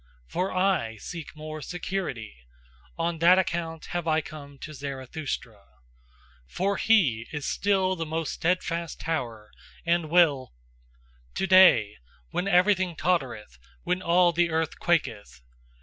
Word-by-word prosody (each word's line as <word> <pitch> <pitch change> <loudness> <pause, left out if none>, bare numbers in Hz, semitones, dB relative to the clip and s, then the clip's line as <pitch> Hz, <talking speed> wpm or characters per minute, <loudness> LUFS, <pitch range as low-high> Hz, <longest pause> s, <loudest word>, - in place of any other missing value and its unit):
For 185 - -2
I 185 -12 +1
seek 160 - -8
more 155 0 -7
SECURITY; 170 - -4 0.6
on 165 0 -2
that 175 +3 +6
account 165 -3 -2
have 175 -1 -2
I 155 0 +3
come 145 -2 -10
to 155 +3 -9
Zarathustra. 135 -5 -6 0.8
For 195 - -1
he 140 - +3
is 150 -2 -5
still 190 -2 +1
the 165 - -3
most 160 0 -2
steadfast 170 -1 -2
tower 120 -10 -4 0.3
and 170 -2 +1
will 150 - +3 0.8
To - - 0
day, 180 - +6 0.3
when 180 - -2
everything 185 -1 +3
tottereth, 125 - -2 0.2
when 180 +1 -1
all 175 0 +4
the 170 +1 +1
earth 160 -1 -2
quaketh. 105 - -1
165 Hz, 125 wpm, -26 LUFS, 140-180 Hz, 0.8 s, that